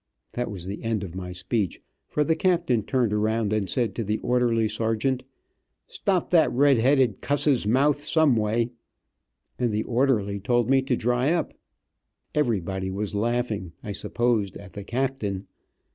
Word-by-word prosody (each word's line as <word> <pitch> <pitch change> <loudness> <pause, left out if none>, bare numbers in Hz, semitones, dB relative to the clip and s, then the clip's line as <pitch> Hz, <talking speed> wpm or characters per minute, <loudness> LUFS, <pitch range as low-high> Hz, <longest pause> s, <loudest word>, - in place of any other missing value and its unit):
That 120 0 -3
was 95 -5 -3
the 100 +2 -6
end 115 -3 -1
of 90 -4 -7
my 90 -1 -6
speech, 95 +2 -2 0.3
for 150 - 0
the 160 +2 +1
captain 170 - +2
turned 120 -1 0
around 110 0 0
and 105 -3 0
said 120 -6 0
to 115 - -3
the 105 +1 -1
orderly 120 -3 +2
sergeant, 115 +4 -1 0.6
"Stop 190 -3 -1
that 160 -8 +5
red 135 0 +4
headed 130 -3 +3
cusses 140 -5 +1
mouth 140 +5 +3
some 155 -3 +3
way," 115 +2 0 0.9
and 120 -2 +1
the 105 +1 0
orderly 115 -6 +1
told 120 +4 +1
me 135 0 +5
to 130 -2 0
dry 125 +5 +1
up. 175 - -1 0.8
Everybody 95 - 0
was 100 +1 -3
laughing, 110 -4 -1
I 105 - -5
supposed, 110 -2 0
at 100 -3 -12
the 100 - -7
captain. 115 -5 -2
115 Hz, 160 wpm, -25 LUFS, 105-130 Hz, 0.9 s, that